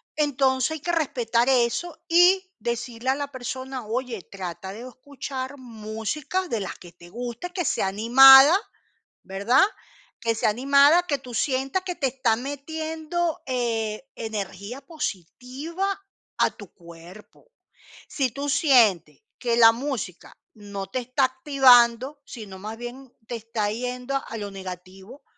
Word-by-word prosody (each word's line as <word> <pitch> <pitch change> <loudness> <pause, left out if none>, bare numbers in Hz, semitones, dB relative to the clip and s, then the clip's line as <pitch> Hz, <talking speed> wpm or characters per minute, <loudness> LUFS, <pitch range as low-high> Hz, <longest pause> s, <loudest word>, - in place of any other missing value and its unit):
Entonces 270 -2 +1
hay 315 - -4
que 345 - -2
respetar 245 -6 0
eso, 265 +7 +1
y 370 +2 +4
decirle 240 +1 -4
a 265 - +3
la 285 0 -5
persona, 260 -1 -6
oye, 235 -2 -3
trata 185 -1 -7
de 235 +5 -9
escuchar 265 +1 -7
música 240 - -4
de 230 - -2
las 195 - -6
que 175 - -14
te 175 0 -16
guste, 240 - -6
que 360 -3 -3
sea 195 - 0
animada, 265 - +8 0.7
¿verdad? 200 - +3 0.6
Que 230 -1 0
sea 220 - +1
animada, 280 +8 +5
que 285 -4 0
tú 250 -2 -11
sientas 270 +8 0
que 360 -2 -5
te 275 - 0
está 250 -3 +1
metiendo, 315 +5 -4
eh, 235 -1 -2
energía 210 +2 -6
positiva 295 - -5 0.4
a - - +3
tu 205 -4 -14
cuerpo. 170 - -15 0.6
Si 265 -4 -1
tú 280 +3 -4
sientes 215 - +3 0.2
que 235 -2 0
la 225 -1 +8
música 235 -7 -5 0.2
no 200 -2 -7
te 225 +7 -3
está 255 +2 +1
activando, 260 0 +4
sino 205 -6 -10
más 215 +3 -7
bien 245 +2 -9
te 240 - -4
está 225 -2 -3
yendo 250 +4 -3
a 230 - -6
lo 205 -2 -6
negativo, 190 +5 -10
250 Hz, 140 wpm, -24 LUFS, 220-280 Hz, 0.7 s, animada